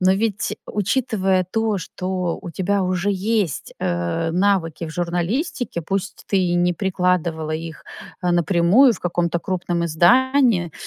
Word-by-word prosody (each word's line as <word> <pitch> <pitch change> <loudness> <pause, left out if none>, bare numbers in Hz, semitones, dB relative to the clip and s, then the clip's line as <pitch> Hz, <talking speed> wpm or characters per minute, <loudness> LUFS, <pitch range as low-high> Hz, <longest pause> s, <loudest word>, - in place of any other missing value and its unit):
Но 185 0 +4
ведь, 210 0 -1
учитывая 200 -3 0
то, 220 +3 -1
что 180 -1 -3
у 180 - -7
тебя 195 +4 0
уже 185 +2 0
есть, 195 - -1
э, 90 - -1
навыки 175 -3 +1
в - - -7
журналистике, 175 - -2
пусть 195 +4 -4
ты 195 - +1
и 180 -2 +1
не 175 0 +2
прикладывала 180 -4 0
их, 160 0 -5 0.4
а, 180 - +1
напрямую 175 - +4
в - - -10
каком-то 170 -1 0
крупном 175 -2 -2
издании, 225 - +3
180 Hz, 140 wpm, -21 LUFS, 170-200 Hz, 0.4 s, Но